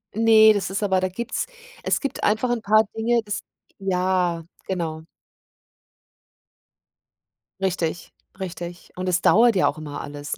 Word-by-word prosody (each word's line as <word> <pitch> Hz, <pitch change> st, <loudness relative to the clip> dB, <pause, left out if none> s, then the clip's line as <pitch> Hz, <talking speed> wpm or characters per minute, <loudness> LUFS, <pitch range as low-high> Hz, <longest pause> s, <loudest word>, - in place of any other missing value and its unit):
Ne, 220 Hz, -1 st, +7 dB
das 195 Hz, -3 st, -2 dB
ist 195 Hz, +2 st, -2 dB
aber 190 Hz, -2 st, +2 dB
da 185 Hz, -, 0 dB
gibt's 235 Hz, -, -3 dB, 0.4 s
es -, -, +1 dB
gibt 280 Hz, -2 st, -4 dB
einfach 220 Hz, +4 st, +2 dB
'n 240 Hz, -1 st, 0 dB
paar 215 Hz, +1 st, +4 dB
Dinge, 230 Hz, +1 st, +1 dB
das 205 Hz, 0 st, -3 dB, 0.4 s
ja, 180 Hz, -3 st, 0 dB, 0.2 s
genau. 165 Hz, -4 st, -3 dB, 2.6 s
Richtig, 175 Hz, -3 st, -2 dB, 0.3 s
richtig, 175 Hz, -2 st, -7 dB
und 185 Hz, 0 st, -3 dB
es 180 Hz, 0 st, +1 dB
dauert 230 Hz, +1 st, +5 dB
ja 185 Hz, -, +3 dB
auch -, -, -2 dB
immer 150 Hz, -2 st, -6 dB
alles, 145 Hz, 0 st, -6 dB
190 Hz, 140 wpm, -23 LUFS, 175-220 Hz, 2.6 s, Ne